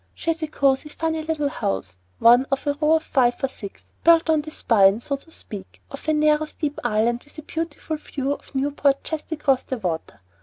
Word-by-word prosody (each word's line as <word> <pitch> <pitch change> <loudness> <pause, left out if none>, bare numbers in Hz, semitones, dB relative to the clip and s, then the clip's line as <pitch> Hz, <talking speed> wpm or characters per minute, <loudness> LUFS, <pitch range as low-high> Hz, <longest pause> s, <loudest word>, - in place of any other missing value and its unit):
She 330 - -1
has 330 0 -5
a 315 - -1
cosey, 280 -1 +1
funny 320 +1 -2
little 310 -2 -1
house, 95 - -3 0.2
one 245 +3 +6
of 275 +1 -1
a 290 - +2
row 300 +2 +2
of 320 - 0
five 245 -5 +2
or - - +3
six, 205 -6 -10 0.2
built 330 -1 +5
on 310 -1 +3
the 305 - -8
spine, 205 -8 +4
so 280 +4 -2
to 275 +4 -14
speak, 205 -11 -9
of 275 - -9
a 310 - +3
narrow, 300 0 +3
steep 300 -1 -4
island, 235 +1 +1
with 295 - -15
a 310 - -7
beautiful 320 0 -4
view 280 -2 -3
of 285 - -12
Newport 280 0 +1
just 315 0 -5
across 280 -4 +2
the 260 - -4
water. 165 - -4
285 Hz, 215 wpm, -23 LUFS, 245-310 Hz, 0.2 s, one